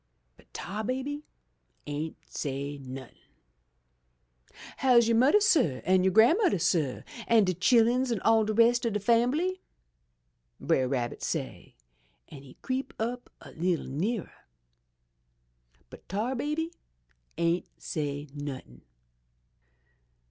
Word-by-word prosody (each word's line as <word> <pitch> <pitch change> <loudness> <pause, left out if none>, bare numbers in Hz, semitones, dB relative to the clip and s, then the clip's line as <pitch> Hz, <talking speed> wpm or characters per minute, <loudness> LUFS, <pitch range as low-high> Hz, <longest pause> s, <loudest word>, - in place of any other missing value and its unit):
"But - - -24
Tar 210 +2 -5
Baby 270 +5 -4 0.6
ain't 150 +2 -4
say 140 0 -4
nothin'. 130 0 -10 0.5
" - - -46
* - - -18
How's 245 -3 +4
you' 230 - +3
mudder, 260 - +5
suh, 290 - +2
an' 185 0 +3
you' 190 - +4
grandmudder, 280 - +4
suh, 160 -6 0 0.2
an' 230 -2 +5
de 185 -1 +1
chilluns, 240 +7 +3
an' 225 - 0
all 225 0 +4
de 215 - -1
rest 235 +2 +4
ob 230 -3 0
de 210 - 0
fambly?' 250 - +1 1.0
Brer 130 - +1
Rabbit 125 -3 -2
say, - - -5 0.5
an' 140 -3 -11
he 135 -2 -15
creep 260 +1 -3
up 245 +2 -4
a - - -12
leetle 175 +1 -1
nearer. 190 - -3 1.6
"But - - -14
Tar 215 +7 -1
Baby 300 +6 -2 0.6
ain't 170 +1 0
say 145 -1 -4
nothin'. 135 - -7
205 Hz, 125 wpm, -28 LUFS, -, 1.6 s, mudder